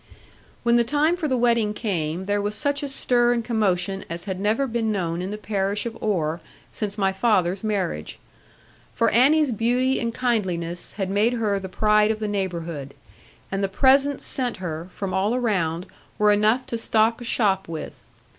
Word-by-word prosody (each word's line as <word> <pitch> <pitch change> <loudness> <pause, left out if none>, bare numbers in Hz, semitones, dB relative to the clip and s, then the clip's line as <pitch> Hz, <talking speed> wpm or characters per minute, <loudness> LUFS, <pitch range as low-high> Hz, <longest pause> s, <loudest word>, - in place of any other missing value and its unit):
When 235 0 +4
the 235 - +4
time 295 +7 +2
for 345 -4 -2
the 260 -3 +1
wedding 230 -3 +2
came, 175 -5 -2
there 205 +1 0
was 205 +1 -2
such 285 +3 -1
a 285 - -3
stir 245 -2 +2
and 235 -2 -2
commotion 195 -4 0
as 170 +2 -5
had 190 -2 -4
never 215 +7 +1
been 230 -3 -1
known 175 -4 -2
in 185 - -4
the 210 - -4
parish 200 0 -1
of 230 -1 -4
Oare 170 -6 -1 0.3
since 205 -1 -4
my 195 -2 +2
father's 190 -3 +1
marriage. 195 - -2 0.8
For 230 - +2
Annie's 285 +4 +4
beauty 245 +4 +1
and 235 -1 -1
kindliness 185 -9 -2
had 195 -2 -3
made 210 +5 +2
her 215 -4 0
the 190 -1 -7
pride 210 +2 +3
of 220 - 0
the 215 -1 -3
neighbourhood; 170 -8 -4 0.6
and 195 +1 -1
the 195 - 0
presents 275 +6 +3
sent 250 -3 -2
her, 170 -1 -5
from 195 -2 -4
all 200 +5 +1
around, 185 -8 0 0.3
were 210 0 +4
enough 215 +5 +2
to 230 - -4
stock 225 +1 +2
a - - -5
shop 200 -5 +1
with. 160 -2 -7
210 Hz, 185 wpm, -24 LUFS, 190-235 Hz, 0.8 s, When